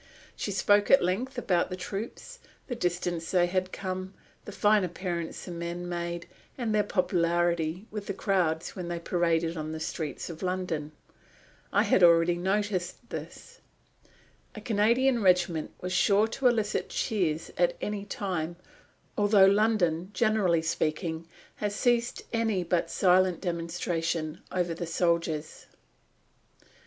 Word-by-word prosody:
She - - -3
spoke 205 +1 +3
at 275 - +6
length 235 +10 -1
about 185 -7 +1
the 185 - -4
troops, 220 - -6 0.3
the 250 - -4
distance 175 -5 -2
they 180 -2 +3
had 185 +1 -1
come, 185 0 -5 0.3
the - - -7
fine 210 -1 +3
appearance 175 -1 -4
the 180 - -7
men 170 +1 -5
made, 170 0 -4 0.3
and 235 -4 -1
their 210 - +4
popularity 175 -2 0
with 210 -1 -6
the 200 - -2
crowds 175 -6 0
when 180 -2 -5
they 175 0 -3
paraded 170 -1 0
on 155 -1 -4
the 160 - -5
streets 155 -2 -4
of 165 -2 -8
London. 180 -5 -2 0.8
I - - +4
had - - +3
already 170 0 +6
noticed 190 +3 -2
this. - - -8 1.0
A - - -6
Canadian 235 +4 +2
regiment 180 -4 +2
was 180 0 -3
sure 200 +4 +4
to 260 +3 +1
elicit 220 -4 0
cheers 170 -8 -1
at - - +2
any 210 -1 -3
time, 180 -5 -3 0.6
although 205 -1 +5
London, 195 -4 +2
generally 195 -7 +2
speaking, 160 +1 -2 0.3
has 205 -1 -2
ceased 240 0 +1
any 225 -5 +1
but 175 0 0
silent 185 -1 +3
demonstration 165 -2 -2
over 180 -2 0
the 170 +1 -5
soldiers. 170 -2 -1
180 Hz, 135 wpm, -28 LUFS, 170-205 Hz, 1.0 s, at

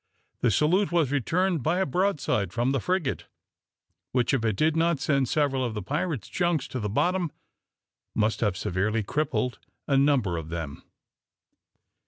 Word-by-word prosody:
The 125 - +2
salute 170 - +2
was 165 -6 +2
returned 165 - +1
by 160 +7 +1
a 190 - +2
broadside 145 - 0
from 120 +4 0
the 135 - +1
frigate, 180 -1 -1 0.9
which, 125 +1 +2
if 130 -4 +1
it 110 -3 +1
did 155 +7 +2
not 165 -2 +2
send 140 -3 +1
several 140 -3 +1
of 120 -3 -2
the 105 - -4
pirate's 145 - -2
junks 170 -6 0
to 130 - -4
the 105 -2 -2
bottom, 175 - +1 0.8
must 110 +1 +1
have 105 -5 0
severely 105 +5 0
crippled 125 -1 -1 0.3
a 140 - +3
number 135 - +2
of 80 -1 -6
them. 80 -4 -5
135 Hz, 160 wpm, -27 LUFS, 110-160 Hz, 0.9 s, a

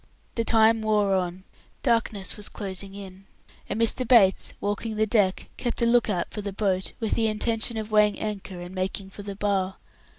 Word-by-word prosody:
The 230 - 0
time 225 0 +4
wore 210 -2 +2
on. 185 0 -1 0.4
Darkness 225 -6 +1
was 210 -1 -3
closing 195 -1 -4
in, 195 -1 -10 0.4
and - - -2
Mr. 230 +2 +1
Bates, 205 -7 +4
walking 205 +2 -2
the 215 +1 +2
deck, 205 -4 +1
kept 240 - -3
a - - +5
look 235 -1 +3
out 180 -4 -1
for 210 - -5
the 200 0 -4
boat, 190 -2 -1
with 225 -3 -2
the 225 -1 +2
intention 225 +1 0
of 215 0 -5
weighing 210 -1 +4
anchor 200 -4 -4
and 175 +1 -8
making 190 +1 -3
for 205 - -9
the 200 -1 -6
Bar. 195 -2 0
205 Hz, 190 wpm, -26 LUFS, 195-220 Hz, 0.4 s, a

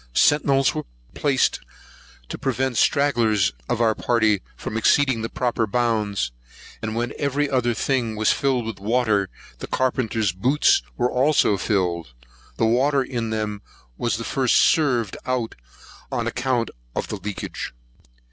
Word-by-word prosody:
Centinels 140 -2 +3
were - - -4 0.3
placed 135 -3 +1 0.7
to - - -6
prevent 130 -1 -1
stragglers 115 - +2 0.2
of - - 0
our 115 -2 +3
party 110 -4 +1
from - - -6
exceeding 130 +1 +3
the 115 - -3
proper 120 -2 -1
bounds; 105 - 0 0.5
and 110 0 -3
when 120 +1 -2
every 145 0 0
other 125 -4 +1
thing 120 -4 0
was 110 0 +2
filled 130 -4 0
with 110 -3 -5
water, 105 -2 +1 0.3
the - - -6
carpenter's 115 -5 0
boots 140 - +3 0.2
were 125 0 +1
also 130 -4 +3
filled. 90 - -1 0.4
The - - +2
water 135 +4 +3
in 120 -3 -3
them 105 -2 -3 0.3
was 120 - -1
first 120 +3 0
served 125 - +3
out, 125 -3 -1 0.6
on - - -1
account 120 -2 -1 0.2
of - - -3
leakage. 105 -2 -5
120 Hz, 135 wpm, -23 LUFS, 110-130 Hz, 0.7 s, Centinels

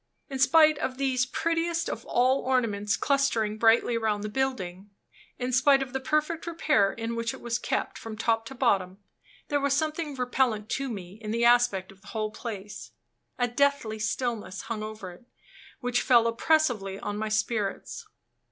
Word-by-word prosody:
In 270 - -4
spite 310 +2 +5
of 255 0 -3
these 260 -2 +1
prettiest 335 +3 -1
of - - -5
all 255 +3 +3
ornaments 215 -6 0
clustering 230 -7 +1
brightly 230 +1 +4
round 210 -2 -1
the 210 - -3
building 205 -7 -3 0.5
in 250 0 -3
spite 275 +1 +5
of 260 -1 -10
the 265 - -1
perfect 305 +4 -1
repair 300 -12 +2
in 230 0 -4
which 230 0 -2
it - - -12
was 240 0 -2
kept - - -2
from 225 -1 -7
top 225 0 0
to 270 - -9
bottom 195 -7 +1 0.5
there 290 - +1
was 280 -1 +2
something 310 0 -2
repellent 250 -4 0
to 275 0 -2
me 195 -2 -8
in 215 - -6
the 235 +2 +1
aspect 240 -6 +3
of 195 0 -19
the - - -18
whole 215 -1 -1
place: 210 -3 -7 0.4
a 245 - +1
deathly 245 -4 +1
stillness 215 -2 -3
hung 225 -2 -4
over 215 -3 -7
it, 235 +8 -17 0.5
which 245 0 0
fell 240 -3 +5
oppressively 230 -5 +1
on 205 0 -4
my 215 +1 -2
spirits. 215 -1 -2
235 Hz, 170 wpm, -27 LUFS, 215-270 Hz, 0.5 s, spite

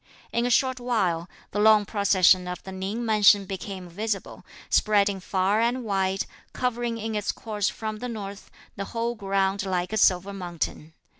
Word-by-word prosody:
In 235 +1 +1
a - - 0
short 260 +1 +2
while, 190 -9 0 0.2
the 205 - -2
long 215 -1 +6
procession 190 -3 +4
of 180 0 -6
the 190 - -8
Ning 195 +5 -4
mansion 210 -2 +5
became 190 -1 -6
visible, 205 +4 -4 0.2
spreading 200 -2 +3
far 190 +3 +1
and 245 +2 0
wide, 195 -2 0 0.3
covering 240 -2 -1
in 225 0 -4
its 210 -1 -1
course 210 -2 -2
from 215 -1 -5
the 250 - -4
north, 200 -3 -7 0.3
the 200 - -4
whole 235 +1 0
ground 195 -2 0
like 185 0 -2
a - - 0
silver 190 0 +3
mountain. 170 -4 -5
200 Hz, 165 wpm, -26 LUFS, 190-220 Hz, 0.3 s, long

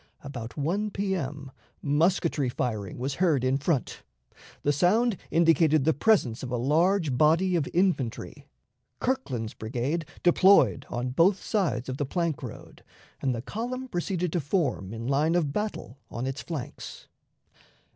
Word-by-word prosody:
About 120 -5 -7
1 185 +9 0
P.M. 160 -9 -3 0.3
musketry 150 -2 +1
firing 110 -6 -3
was 130 +3 -2
heard 155 -9 +3
in 130 +1 +2
front; 145 -3 -1 0.6
the 145 - +2
sound 210 - +3
indicated 160 -3 +4
the 160 - +4
presence 145 - +2
of 130 - -5
a 125 - -1
large 160 +4 +2
body 165 +6 +3
of 160 -5 0
infantry. 170 -10 -1 0.5
Kirkland's 130 - -2
brigade 125 +9 -3 0.2
deployed 175 -6 +5
on 125 +1 -2
both 180 +8 +3
sides 165 - -1
of 130 0 -4
the 145 - -1
plank 170 -2 -1
road, - - -10 0.4
and 130 -2 0
the 115 - -5
column 250 - -4
proceeded 175 -4 -2
to 175 - +1
form 140 - -1
in 115 +1 -6
line 145 +5 +2
of 155 -5 +1
battle 210 - -4
on 120 +2 -4
its 135 +2 -3
flanks. 155 -7 -7
150 Hz, 145 wpm, -27 LUFS, 130-180 Hz, 0.6 s, deployed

